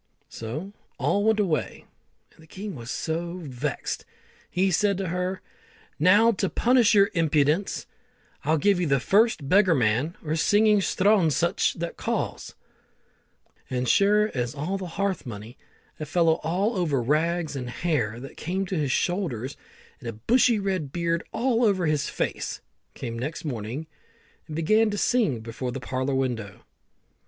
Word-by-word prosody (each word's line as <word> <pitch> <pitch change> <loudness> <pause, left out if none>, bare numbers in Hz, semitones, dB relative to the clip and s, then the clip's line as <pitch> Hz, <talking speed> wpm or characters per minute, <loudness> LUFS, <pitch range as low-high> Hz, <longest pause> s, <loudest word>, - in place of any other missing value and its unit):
So 150 - -6 0.2
all 205 - +1
went 220 0 +3
away, 160 - -1 0.5
and - - -21
the 160 - -17
king 195 +4 -7
was 120 -4 -9
so 170 +4 -3
vexed, 135 0 -4 0.5
he 190 +2 +1
said 200 +2 +2
to 190 -3 -3
her, 180 +2 -2 0.6
"Now 205 +8 +6
to 195 -3 -1
punish 240 -3 +3
your 200 -1 +5
impudence, 160 +2 +1 0.6
I'll 155 +3 +2
give 195 +4 +3
you 175 - 0
to 140 - +3
the - - +1
first 205 - +2
beggarman 155 - +3
or 155 +1 0
singing 210 +6 +4
sthronshuch 185 -5 +2
that 170 0 -5
calls;" - - -3 1.1
and, 125 -1 -1
as - - +3
sure 210 +2 +3
as 125 -1 -2
the 140 - -7 0.3
hearth 190 -3 -2
money, 110 +2 -8 0.4
a 155 - -5
fellow 165 0 +2
all 195 +8 0
over 155 -7 +1
rags, 155 +5 0
and 125 -3 -4
hair 120 -7 -1
that 135 - -10
came 190 +3 -2
to 185 - -3
his 145 -5 0
shoulders, 145 - -1 0.4
and 120 - -6
a - - -5
bushy 230 - +3
red 190 -8 -2
beard 170 0 -1
all 245 -1 +1
over 195 -5 +2
his 150 -2 0
face, - - -3 0.4
came 115 0 -5
next 150 +6 -5
morning, 125 +2 -4 0.6
and 155 - -6
began 215 +8 +3
to 205 - -3
sing 200 - +1
before 115 +3 -5
the 135 - -5
parlour 130 +2 -2
window. 120 -7 -2
165 Hz, 155 wpm, -26 LUFS, 135-195 Hz, 1.1 s, Now